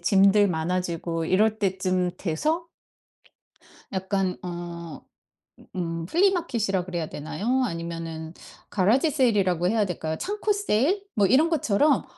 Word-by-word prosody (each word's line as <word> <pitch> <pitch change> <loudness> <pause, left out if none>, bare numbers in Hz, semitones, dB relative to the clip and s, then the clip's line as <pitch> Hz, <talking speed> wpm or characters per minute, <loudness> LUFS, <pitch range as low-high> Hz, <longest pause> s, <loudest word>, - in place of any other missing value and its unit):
짐들 195 +3 +5
많아지고 170 0 -2
이럴 215 +5 +2
때쯤 185 -2 0
돼서 310 - -1 1.3
약간 190 -1 -1
어 170 -2 -6 0.7
음 165 -2 -3
플리마켓 335 - +1
이라 185 -2 0
그래야 170 -4 -3
되나요? 230 - -1
아니면은 165 -4 -5 0.3
가라지 220 - +3
세일 255 -7 +2
이라고 180 -2 +2
해야 215 0 +2
될까요? 160 -2 -3
창고 420 +1 -1
세일? 390 - +1
뭐 205 - +4
이런 275 - +4
것처럼 290 -2 +2
190 Hz, 270 characters per minute, -25 LUFS, 170-245 Hz, 1.3 s, 짐들